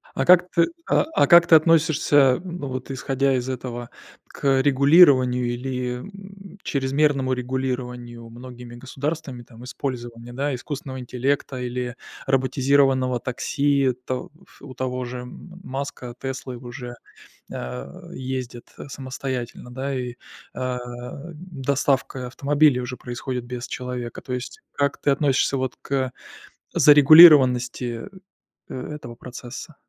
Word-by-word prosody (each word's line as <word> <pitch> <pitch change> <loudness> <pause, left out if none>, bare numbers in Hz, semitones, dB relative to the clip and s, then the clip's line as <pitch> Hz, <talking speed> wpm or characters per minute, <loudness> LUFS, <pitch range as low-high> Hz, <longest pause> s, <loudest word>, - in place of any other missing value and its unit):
А, 135 - 0
как 180 +1 +6
ты 170 -1 +3 0.2
а - - +4
а, - - +4
как 170 -1 +7
ты 165 - +6
относишься, 160 -2 +4 0.3
м, 180 -1 -6
ну 140 - -5
вот 130 +1 -6
исходя 135 0 0
из 125 0 -2
этого, 120 -2 -5 0.4
к 135 -1 +1
регулированию, 135 -3 +5
или, 125 0 -3
м, 195 +3 -12
чрезмерному 135 -1 +1
регулированию 125 -2 -4
многими 120 0 -11
государствами, 135 +1 -5
там, 120 0 -15
использования, 120 -2 -6
да, 140 +2 -2
искусственного 130 0 -6
интеллекта 130 +2 -2
или 125 0 -4 0.3
роботизированного 130 -1 +2
такси? 140 +1 0
То 130 -1 -4 0.3
у 135 -2 -11
того 125 -1 -3
же 125 +1 -6
м 175 +8 -11
Маска, 130 -3 -6
Теслы, 130 -1 -5
уже, 120 0 -8 0.6
а, 60 +2 -7
ездят, 130 -2 -5
э, - - -9
самостоятельно, 130 -2 -6
да, 135 +2 -3
и, 125 -1 -4 0.4
а, 125 0 -3 0.6
доставка 140 -5 -1
автомобилей 145 +1 +2
уже 125 0 -5
происходит 125 0 -5
без 125 0 -6
человека. 125 -2 -5
То 130 - -7
есть, 125 - -5
как 140 0 -1
ты 145 - +2
относишься, 135 -1 +2
вот, 130 -1 -2
к 130 -2 -1 0.6
зарегулированности, 135 - +7 0.6
э, - - -6 0.2
этого 120 -5 -9
процесса? 125 +5 -9
130 Hz, 125 wpm, -23 LUFS, 125-140 Hz, 0.6 s, как